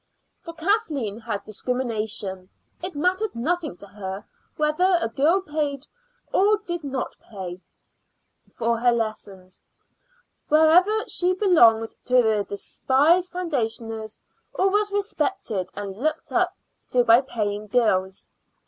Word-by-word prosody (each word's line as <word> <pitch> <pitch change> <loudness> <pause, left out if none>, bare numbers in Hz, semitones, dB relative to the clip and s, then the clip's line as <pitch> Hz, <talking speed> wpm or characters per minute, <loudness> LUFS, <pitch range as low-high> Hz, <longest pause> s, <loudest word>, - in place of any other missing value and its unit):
For 335 - -9
Kathleen 320 - -1
had 220 -3 -4
discrimination; 215 -5 -3 0.3
it 360 -1 -2
mattered 370 - 0
nothing 310 - -2
to 200 - -11
her 195 0 -7 0.3
whether 325 +5 +3
a 330 - 0
girl 310 +11 +2
paid 295 -5 -3 0.5
or 420 +2 +4
did 345 -5 -5
not 270 -2 -4
pay 185 -4 -8 0.9
for 230 0 -1
her 245 +1 +4
lessons, 205 -5 -4 0.9
whether 350 +8 +4
she 360 +1 +1
belonged 235 - +4
to 250 - +1
the 215 -2 +2
despised 300 - +2
foundationers 225 -10 -3 0.4
or 385 +1 +2
was 415 0 +1
respected 380 - -2
and 200 -1 -6
looked 310 +8 -2
up - - +1 0.3
to 250 -1 +2
by 230 +2 +6
paying 210 -5 -3
girls. 190 -5 0
255 Hz, 120 wpm, -24 LUFS, 215-350 Hz, 0.9 s, by